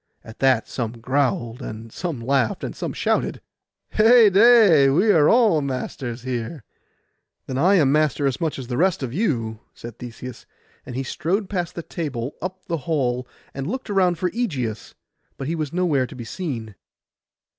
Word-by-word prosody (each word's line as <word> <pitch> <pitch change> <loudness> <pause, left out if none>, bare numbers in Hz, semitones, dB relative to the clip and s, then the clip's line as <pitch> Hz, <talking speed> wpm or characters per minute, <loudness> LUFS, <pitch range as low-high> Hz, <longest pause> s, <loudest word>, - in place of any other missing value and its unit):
At 110 - -13
that 130 -4 +3
some 115 -3 -3
growled, 125 0 -1
and 110 -1 -7
some 165 -9 -4
laughed, 125 -2 0
and - - -4 0.2
shouted, - - 0 0.5
'Heyday! 215 - +6
we 185 +10 +4
are 155 -6 +5
all 220 -10 +4
masters 130 -2 -4
here.' 125 +2 -4 0.8
'Then 130 0 -3
I 185 +6 +5
am 145 -7 +4
master 150 -1 +2
as 135 +5 -1
much 160 -2 -1
as 130 - -6
the 120 0 -4
rest 180 -3 +2
of 125 -2 -4
you,' 120 - -1 0.2
said 120 -2 -10
Theseus, 125 0 -9 0.4
and 125 - -7
he 135 - -2
strode 185 +10 -2
past 175 -4 -2
the 170 - -5
table 135 -7 -4
up 185 +2 -6
the 170 - -2
hall, 125 -5 0 0.3
and 135 +1 -4
looked 255 +1 -4
around 185 -3 +2
for 180 +1 -1
Ægeus; 130 - -3 0.4
but 135 - -5
he 160 - -1
was 155 -4 -3
nowhere 165 -8 +1
to - - -11
be 120 -2 -7
seen. 115 - -5
140 Hz, 165 wpm, -23 LUFS, 125-180 Hz, 0.8 s, Heyday